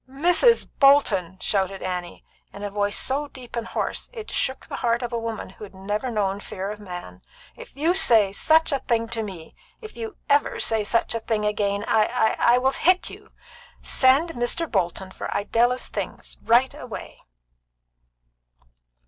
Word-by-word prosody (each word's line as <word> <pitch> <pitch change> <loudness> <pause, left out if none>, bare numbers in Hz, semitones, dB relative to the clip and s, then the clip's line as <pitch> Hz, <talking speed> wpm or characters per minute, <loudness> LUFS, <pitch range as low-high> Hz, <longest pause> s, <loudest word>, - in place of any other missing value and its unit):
"Mrs. 350 - +3
Bolton!" 210 - +4
shouted 195 0 -1
Annie, 180 -1 -5 0.3
in 200 - -9
a 205 - -4
voice 205 0 0
so 285 +3 0
deep 255 -4 -11
and 230 -1 -3
hoarse - - -3
that - - -19
it 430 - -11
shook 265 - -2
the - - -6
heart 235 0 0
of 240 0 -4
a 235 - 0
woman 225 -3 -5
who 205 - -13
had 200 -2 -11
never 205 +6 -3
known 200 -3 -1
fear 195 0 -5
of 210 - -8
man. 175 - -9 0.3
"If - - -13
you 320 +5 +2
say 225 - +4
such 320 +10 +3
a 275 - +1
thing 230 -2 0
to 230 -1 -3
me 185 -7 -8 0.3
if 435 -2 -11
you 225 -1 -7
ever 285 0 +2
say 220 -1 +1
such 230 +3 +1
a 230 - -1
thing 220 -1 -1
again 205 -1 0
I 215 -1 +3
I 240 0 +2
I - - +3
will 265 +1 +2
hit 365 +6 +2
you! - - -14 0.5
Send 275 +6 +4
Mr. 245 +6 -1
Bolton 190 - -2
for - - -6
Idella's 235 +5 +1
things - - -6
right 245 +4 +3
away!" 250 -6 -9
230 Hz, 175 wpm, -24 LUFS, 200-265 Hz, 0.5 s, Bolton